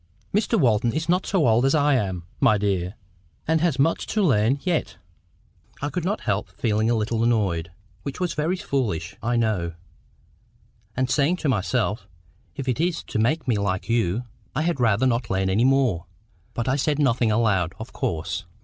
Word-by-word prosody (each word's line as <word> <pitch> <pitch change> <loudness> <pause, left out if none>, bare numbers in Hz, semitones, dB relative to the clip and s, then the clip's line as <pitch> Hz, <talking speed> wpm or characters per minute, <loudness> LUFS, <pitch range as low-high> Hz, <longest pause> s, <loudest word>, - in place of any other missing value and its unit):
"Mr 220 +3 +2
Walton 115 -4 +3
is 160 +2 -2
not 180 +2 +1
so 180 -10 +2
old 115 +2 +4
as 135 +3 +3
I 145 -1 +3
am, 95 -8 -1 0.2
my 120 -6 +4
dear, 95 -1 -1 0.5
and 160 0 +2
has 165 -6 +1
much 150 +5 +1
to 215 - 0
learn 125 - +3
yet." 175 -4 -1 0.8
I 145 - -2
could 180 - -2
not 200 +5 -1
help - - -1
feeling 110 -1 0
a 120 - +3
little 110 +1 0
annoyed, 100 -8 +1 0.3
(which 140 - -6
was 180 -3 -1
very 155 +5 0
foolish, 115 - -2
I 120 +1 0
know,) 105 -8 0 1.2
and 130 0 +1
saying 145 +6 +2
to 155 - -1
myself, 100 -1 0 0.5
"If 135 -2 -5
it's 165 +7 0
to - - -3
make 140 +7 +1
me 115 -5 +2
like 100 0 -2
you, 115 -1 +1 0.3
I 150 - +1
had 170 -4 0
rather 115 0 +3
not 120 -3 0
learn 95 0 0
any 110 +6 +3
more;" 130 -11 +2 0.5
but 120 - -2
I 130 +2 +2
said 145 +1 +1
nothing 125 -5 +2
aloud, 105 -6 +1
of 110 +1 -9
course. 85 +4 -3
120 Hz, 180 wpm, -24 LUFS, 105-145 Hz, 1.2 s, old